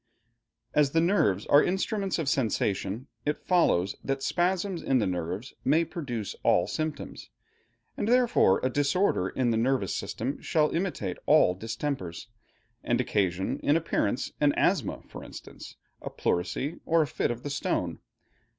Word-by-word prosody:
As 145 -2 +3
the 165 - +4
nerves 165 - +2
are 145 - +6
instruments 195 +1 -1
of 160 -4 -2
sensation, 110 -3 0 0.2
it 150 0 -2
follows 100 - +2
that 135 0 -2
spasms 185 0 0
in 135 - +2
the 115 - +2
nerves 90 +6 -3
may 160 +5 +3
produce 125 - -5
all - - +3
symptoms, 155 -1 -5 0.7
and 205 - -2
therefore 240 - +4
a 130 - +2
disorder 145 - +1
in 125 -2 0
the 110 - +1
nervous 120 -4 +1
system 130 +6 -4
shall 155 -3 +1
imitate 165 - -2
all 90 - +5
distempers, 110 - -4 0.5
and 120 0 +1
occasion, 95 -6 0
in 145 +3 +3
appearance, 140 -8 -1
an 145 -1 +4
asthma - - 0
for - - -9
instance, - - -11 0.3
a - - -5
pleurisy, 90 - -2
or 165 -1 +3
a - - -4
fit - - -1
of 120 +1 -4
the 145 - -4
stone. 90 - -2
135 Hz, 150 wpm, -28 LUFS, 100-165 Hz, 0.7 s, are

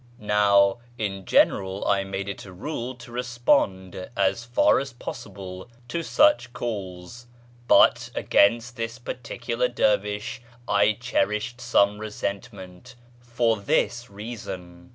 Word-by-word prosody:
Now 100 0 +3 0.2
in 95 -3 -3
general 95 0 +2
I 100 -1 +2
made 95 0 -4
it 100 - -6
a 95 - -11
rule 125 - -5
to 120 0 -13
respond, 120 -7 0
as 100 +4 +1
far 120 +1 +3
as 135 -2 -5
possible, 95 -3 -8 0.2
to 170 - -2
sucli 295 - +3
calls; 100 0 -6 0.4
but - - +5
against 115 +4 +2
this 115 +1 -4
particular 120 0 -3
dervish 105 0 0 0.3
I 105 +1 +3
cherished 110 0 -1
some 105 -3 +3
resentment, 105 +1 -6 0.2
for 120 -1 0
this 120 +4 0
reason. 95 -5 -8
105 Hz, 115 wpm, -25 LUFS, 100-120 Hz, 0.4 s, but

